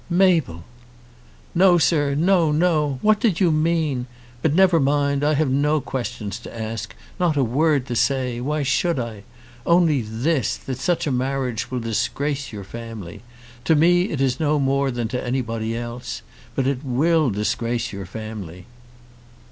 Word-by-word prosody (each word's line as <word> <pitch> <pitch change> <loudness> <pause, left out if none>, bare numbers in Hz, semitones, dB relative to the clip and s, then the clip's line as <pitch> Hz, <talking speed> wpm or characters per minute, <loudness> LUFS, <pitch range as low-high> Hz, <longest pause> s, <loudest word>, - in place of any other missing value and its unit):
"Mabel!" 170 - +2 0.9
"No, 180 0 +5
sir, 145 -1 +2
no; 170 0 +3
no! 150 -3 +1
What 215 0 +4
did 205 -8 +1
you 180 -4 +4
mean? 155 -5 0 0.3
But 160 -1 +1
never 185 -2 +5
mind. 140 0 +1
I 150 +1 +3
have 145 -2 +1
no 150 +3 +2
questions 120 -6 -5
to 120 - -10
ask, 110 0 -5 0.2
not 170 -4 +1
a 140 - +3
word 140 +3 +2
to 120 - -4
say. 125 -1 0
Why 150 +3 -1
should 150 +5 +1
I? 115 -4 -4 0.4
Only 170 -4 +3
this, 120 +6 -1
that 130 -1 -6
such 175 +4 0
a 145 - -1
marriage 130 -2 -2
will 125 -1 -3
disgrace 140 +5 -2
your 105 -3 -7
family. 105 -3 -8 0.4
To 160 - +4
me 175 +4 +4
it 140 - -2
is 130 -2 +1
no 150 -1 +2
more 140 0 +1
than 120 -2 -2
to 125 +1 -3
anybody 115 -3 -2
else. 120 +1 -6 0.3
But 135 - 0
it 135 0 -1
will 150 +3 +2
disgrace 115 +3 -2
your 100 -2 -6
family." 100 -4 -8
135 Hz, 160 wpm, -22 LUFS, 120-155 Hz, 0.9 s, No